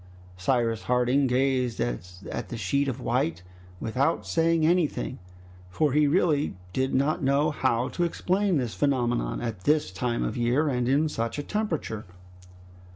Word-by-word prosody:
Cyrus 115 Hz, +3 st, 0 dB
Harding 125 Hz, +2 st, +2 dB
gazed 125 Hz, -3 st, +1 dB
at 90 Hz, -, -4 dB
the 120 Hz, -, -5 dB
sheet 140 Hz, +8 st, 0 dB
of 130 Hz, -, -3 dB
white 85 Hz, +2 st, -1 dB, 0.4 s
without 125 Hz, -, 0 dB
saying 165 Hz, -, +2 dB
anything, 165 Hz, -6 st, +1 dB, 0.5 s
for 145 Hz, +9 st, +1 dB
he 150 Hz, 0 st, +4 dB
really 150 Hz, -, +2 dB, 0.2 s
did 130 Hz, 0 st, 0 dB
not 140 Hz, +4 st, +1 dB
know 140 Hz, +3 st, +2 dB
how 125 Hz, -4 st, +1 dB
to 175 Hz, -, -1 dB
explain 185 Hz, +2 st, +1 dB
this 125 Hz, -5 st, -2 dB
phenomenon, 125 Hz, -4 st, 0 dB
at 110 Hz, -6 st, -5 dB
this 150 Hz, -9 st, +2 dB
time 120 Hz, +6 st, -1 dB
of -, -, -2 dB
year 125 Hz, +6 st, +1 dB
and 125 Hz, -2 st, 0 dB
in 145 Hz, +4 st, +3 dB
such 115 Hz, -5 st, -3 dB
a 145 Hz, -, -3 dB
temperature. 160 Hz, -, -3 dB
130 Hz, 150 wpm, -27 LUFS, 115-150 Hz, 0.5 s, he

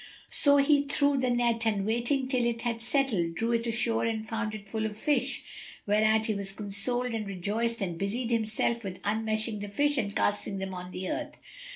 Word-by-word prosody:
So 285 Hz, -1 st, +5 dB
he 285 Hz, 0 st, +4 dB
threw 285 Hz, -1 st, +2 dB
the 255 Hz, -1 st, +1 dB
net 240 Hz, -1 st, +1 dB
and 205 Hz, -3 st, +1 dB
waiting 240 Hz, +5 st, +1 dB
till 255 Hz, -2 st, +1 dB
it 230 Hz, -1 st, -2 dB
had 230 Hz, -1 st, -2 dB
settled, 230 Hz, -, +1 dB
drew 230 Hz, +6 st, 0 dB
it 235 Hz, 0 st, 0 dB
ashore 230 Hz, 0 st, +1 dB
and 220 Hz, -1 st, -2 dB
found 225 Hz, -1 st, -2 dB
it 205 Hz, -1 st, -9 dB
full 220 Hz, +2 st, -2 dB
of 210 Hz, -1 st, -8 dB
fish, 275 Hz, +1 st, 0 dB, 0.4 s
whereat 215 Hz, +1 st, +3 dB
he 220 Hz, -, +1 dB
was 200 Hz, -1 st, -3 dB
consoled 225 Hz, +5 st, 0 dB
and 215 Hz, -2 st, -3 dB
rejoiced 210 Hz, +4 st, -1 dB
and 175 Hz, -3 st, -4 dB
busied 230 Hz, +5 st, -2 dB
himself 230 Hz, +1 st, 0 dB
with 190 Hz, -2 st, -5 dB
unmeshing 220 Hz, +1 st, 0 dB
the 205 Hz, 0 st, -5 dB
fish 290 Hz, +6 st, +2 dB
and 200 Hz, -4 st, -2 dB
casting 205 Hz, -1 st, 0 dB
them 190 Hz, 0 st, -4 dB
on 180 Hz, 0 st, -6 dB
the 185 Hz, 0 st, -5 dB
earth. -, -, -4 dB
225 Hz, 200 wpm, -29 LUFS, 205-240 Hz, 0.4 s, So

